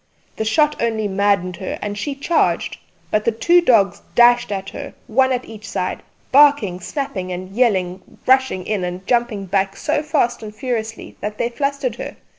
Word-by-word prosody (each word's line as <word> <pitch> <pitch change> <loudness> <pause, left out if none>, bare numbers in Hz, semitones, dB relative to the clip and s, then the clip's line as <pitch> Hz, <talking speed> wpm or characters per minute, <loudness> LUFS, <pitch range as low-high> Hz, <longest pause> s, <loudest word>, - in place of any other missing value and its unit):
The 220 - -1
shot 300 +6 +2
only 220 -2 0
maddened 195 -2 +1
her, 190 - -4
and 205 0 -4
she 275 +8 -3
charged; 315 +4 0 0.3
but 215 - +2
the 230 - +2
two 345 +10 +4
dogs 220 - +3
dashed 240 -1 +5
at 195 -1 -4
her, - - -8
one 260 +4 +2
at 250 -1 -1
each 220 0 -10
side, 180 - -3 0.3
barking 275 -10 +5
snapping 195 - -4
and 185 +1 -6
yelling 190 -7 0
rushing 260 -8 +3
in 210 -3 -1
and 180 +1 -5
jumping 235 -4 0
back 195 +1 0
so 295 -1 0
fast 295 -6 0
and 215 -1 -8
furiously 225 -3 -4
that 210 +1 -4
they 235 - 0
flustered 275 -1 -2
her. - - -6
220 Hz, 175 wpm, -20 LUFS, 195-260 Hz, 0.3 s, dashed